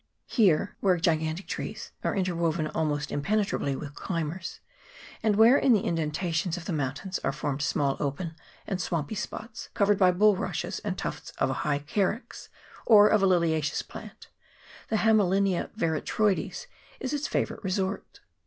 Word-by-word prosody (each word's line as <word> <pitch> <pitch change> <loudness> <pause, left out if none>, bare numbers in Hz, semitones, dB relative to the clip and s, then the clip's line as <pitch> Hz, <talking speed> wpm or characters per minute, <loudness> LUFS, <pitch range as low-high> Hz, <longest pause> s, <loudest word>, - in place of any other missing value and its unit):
Here, 190 - +2
where 185 -3 +3
gigantic 160 0 0
trees - - -5
are - - 0
interwoven 170 -4 0
almost 150 -1 -2
impenetrably 195 -4 0
with 145 +1 -7
climbers, 170 +2 -4 0.6
and 215 -2 +2
where 230 +6 +7
in 260 - +4
the 210 - +2
in 170 - 0
dentations 165 +2 -1
of 170 - -8
the 175 - -2
mountains 145 +6 -2
are 135 - -1
formed 145 0 -3
small 140 -1 +1
open 155 +4 -3 0.3
and 190 -2 -2
swampy 165 -1 -2
spots 220 +2 -6
covered 205 -1 +3
by 185 -2 +6
bulrushes 205 +2 +1
and - - -4
tufts - - -5
of 135 - +1
a 130 - -3
high 145 -2 +1
carex, 195 - -2 0.3
or 210 -2 +7
a 215 - +6
liliaceous 170 -6 +1
plant, - - -11 0.6
the 220 - +1
Hame 220 0 +4
linia 195 -1 +1
veratroides, 190 +3 0 0.3
is 260 +2 -3
its 295 +1 -1
favourite - - -2
resort. 190 +1 -3
180 Hz, 155 wpm, -28 LUFS, 155-205 Hz, 0.6 s, where